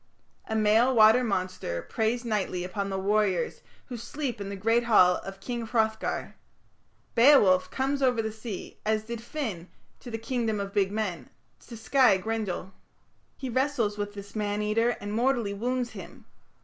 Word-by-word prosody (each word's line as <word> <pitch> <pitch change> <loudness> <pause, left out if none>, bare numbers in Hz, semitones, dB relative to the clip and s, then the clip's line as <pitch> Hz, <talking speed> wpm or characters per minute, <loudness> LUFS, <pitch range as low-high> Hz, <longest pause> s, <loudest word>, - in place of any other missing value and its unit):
A 220 - -1
male 220 +4 +4
water 220 +3 +6
monster 185 - -2
preys 230 +2 -1
nightly 200 -5 -1
upon 195 +2 -3
the 195 - -2
warriors 200 -1 0 0.2
who 245 - -7
sleep 245 -1 -4
in 200 - -5
the 200 - -5
great 225 +4 +1
hall 185 -6 +5
of 195 0 -9
King 240 +2 -4
Hrothgar. 220 -1 -1 0.8
Beowulf 230 -8 +5
comes 275 +1 -1
over 250 -3 +2
the 220 -1 -1
sea, 220 -2 -8
as 215 0 0
did 230 0 -6
Finn 225 - -5 0.3
to 245 - -10
the 225 - -3
"Kingdom 225 -2 -2
of 200 0 -5
Big 195 -2 +1
Men", 190 - -3 0.4
to 230 - -9
sky 240 -2 +4
Grendel. 195 -2 -3 0.6
He 265 - -5
wrestles 245 -5 0
with 205 0 -4
this 200 +1 -10
man 210 0 -1
eater 230 +3 +1
and 205 0 -5
mortally 235 -3 +1
wounds 245 +3 -2
him. - - -11
220 Hz, 160 wpm, -27 LUFS, 200-240 Hz, 0.8 s, water